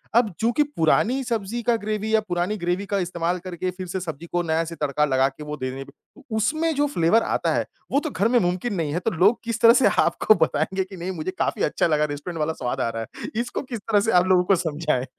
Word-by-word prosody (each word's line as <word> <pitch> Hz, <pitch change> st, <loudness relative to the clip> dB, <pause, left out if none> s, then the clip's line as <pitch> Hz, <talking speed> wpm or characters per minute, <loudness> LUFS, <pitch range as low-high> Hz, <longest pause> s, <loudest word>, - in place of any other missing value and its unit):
अब 230 Hz, -4 st, +4 dB
चूँकि 235 Hz, +6 st, +2 dB
पुरानी 260 Hz, -, +1 dB
सब्जी 230 Hz, -1 st, -2 dB
का 235 Hz, +1 st, +3 dB
ग्रैवी 215 Hz, 0 st, -3 dB
या 220 Hz, -, +6 dB
पुरानी 180 Hz, +4 st, -1 dB
ग्रैवी 175 Hz, +3 st, -1 dB
का 200 Hz, -, -1 dB
इस्तेमाल 175 Hz, 0 st, -1 dB
करके 180 Hz, 0 st, -3 dB
फिर 185 Hz, 0 st, -7 dB
से 190 Hz, +2 st, -3 dB
सब्जी 165 Hz, -2 st, -6 dB
को 175 Hz, -, +1 dB
नया 160 Hz, 0 st, +1 dB
से 165 Hz, -, -7 dB
तड़का 150 Hz, +1 st, +1 dB
लगाकर 135 Hz, +1 st, 0 dB
वो 150 Hz, 0 st, -6 dB
देने 130 Hz, 0 st, -4 dB
में, 135 Hz, -, -6 dB, 0.3 s
तो 290 Hz, -, -18 dB
उसमें 315 Hz, +8 st, +1 dB
जो 290 Hz, +1 st, +2 dB
फ्लेवर 195 Hz, -, +2 dB
आता -, -, 0 dB
है -, -, 0 dB, 0.3 s
वो 280 Hz, -, +3 dB
तो 310 Hz, -, -4 dB
घर 210 Hz, -3 st, +1 dB
में 245 Hz, +1 st, +3 dB
मुमकिन 180 Hz, +5 st, -1 dB
नहीं 160 Hz, -5 st, -2 dB
है 175 Hz, -, 0 dB
तो 225 Hz, -, -1 dB
लोग 190 Hz, +7 st, +3 dB
किस 230 Hz, 0 st, -3 dB
तरह 230 Hz, 0 st, +8 dB
से 255 Hz, -, +4 dB, 0.2 s
आपको 215 Hz, -, +3 dB
बताएँगे 190 Hz, +6 st, -1 dB
कि 190 Hz, +1 st, -11 dB
नहीं, 180 Hz, +2 st, -4 dB
मुझे 180 Hz, +1 st, -4 dB
काफ़ी -, -, 0 dB
अच्छा -, -, +1 dB
लगा 150 Hz, -1 st, +2 dB
रेस्टोरेंट 150 Hz, +3 st, -5 dB
वाला 155 Hz, +1 st, 0 dB
स्वाद 120 Hz, -, -3 dB
आ 115 Hz, -, 0 dB
रहा 115 Hz, 0 st, -4 dB, 0.2 s
है, -, -, -6 dB
इसको 245 Hz, 0 st, -4 dB
किस 245 Hz, -5 st, -6 dB
तरह 205 Hz, 0 st, +2 dB
से 225 Hz, +3 st, +1 dB
आप 180 Hz, 0 st, +4 dB
लोगों 180 Hz, -1 st, +4 dB
को -, -, +6 dB
समझाएँ? 155 Hz, -6 st, -1 dB
185 Hz, 250 wpm, -23 LUFS, 160-225 Hz, 0.3 s, तरह